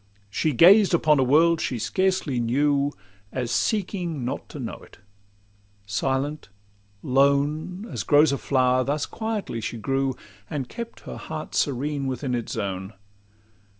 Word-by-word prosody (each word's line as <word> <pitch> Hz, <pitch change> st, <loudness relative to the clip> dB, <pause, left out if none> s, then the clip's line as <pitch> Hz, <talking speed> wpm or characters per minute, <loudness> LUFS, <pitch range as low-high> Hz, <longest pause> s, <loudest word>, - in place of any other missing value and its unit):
She 155 Hz, +9 st, +1 dB
gazed 185 Hz, -, +6 dB
upon 155 Hz, -3 st, +3 dB
a -, -, +4 dB
world 160 Hz, +5 st, +4 dB
she 125 Hz, -, -2 dB
scarcely 185 Hz, -, 0 dB
knew, 140 Hz, +4 st, +1 dB, 0.4 s
As 125 Hz, -2 st, -3 dB
seeking 175 Hz, -, -1 dB
not 130 Hz, +3 st, -4 dB
to 150 Hz, -, -8 dB
know 120 Hz, -, -5 dB
it; -, -, -17 dB, 0.9 s
silent, 135 Hz, +8 st, -2 dB, 0.5 s
lone, 145 Hz, -, +1 dB
As -, -, -4 dB
grows 150 Hz, 0 st, +5 dB
a 140 Hz, -, -1 dB
flower, 130 Hz, -1 st, +2 dB
thus 145 Hz, +3 st, -1 dB
quietly 220 Hz, -, -4 dB
she 115 Hz, -, -4 dB
grew, 135 Hz, +3 st, -1 dB, 0.3 s
And 140 Hz, -4 st, -3 dB
kept 235 Hz, -, -8 dB
her -, -, -8 dB
heart -, -, -7 dB
serene 140 Hz, +1 st, -1 dB
within 130 Hz, 0 st, -3 dB
its 120 Hz, -2 st, -3 dB
zone. 95 Hz, -2 st, -4 dB
140 Hz, 140 wpm, -25 LUFS, 125-160 Hz, 0.9 s, gazed